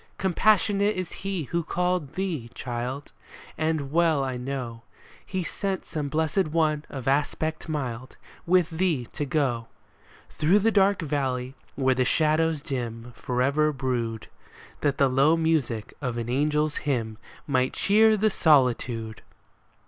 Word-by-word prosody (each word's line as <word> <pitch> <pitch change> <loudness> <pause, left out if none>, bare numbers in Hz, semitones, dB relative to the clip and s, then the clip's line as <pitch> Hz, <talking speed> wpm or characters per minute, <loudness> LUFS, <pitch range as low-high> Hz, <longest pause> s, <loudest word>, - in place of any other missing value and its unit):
Compassionate 205 +2 +2
is 185 -2 -4
He 195 -3 -3
who 170 +5 -2
called 180 -3 -1
thee, 170 -11 -3
child; 125 +3 -4 0.4
And 155 -3 -1
well 160 -3 +3
I 130 -1 -2
know 125 -2 -5 0.4
He 190 -2 -3
sent 195 +3 -3
some 150 -3 -4
Blessed 160 +4 +1
One 155 -1 +1
of 135 -3 -7
aspect 155 +4 0
mild 130 -5 -4 0.3
With 180 -2 +3
thee 160 -6 0
to 145 - -2
go 130 -6 0 0.6
Through 165 +7 +3
the 220 +2 +3
dark 200 -3 +3
valley, 135 -4 -2 0.2
where 130 -1 +2
the 130 0 +1
shadows 155 +3 +2
dim 120 -2 -5
Forever 140 +6 +1
brood, 120 -5 -3 0.5
That 145 -2 0
the 140 - +4
low 135 +5 +3
music 150 -10 0
of 125 -4 -2
an 120 0 -3
angel's 150 +3 +1
hymn 115 -6 -2 0.3
Might 130 -2 +1
cheer 215 +2 +4
the 215 +1 +2
solitude 120 - +2
145 Hz, 135 wpm, -26 LUFS, 125-165 Hz, 0.6 s, the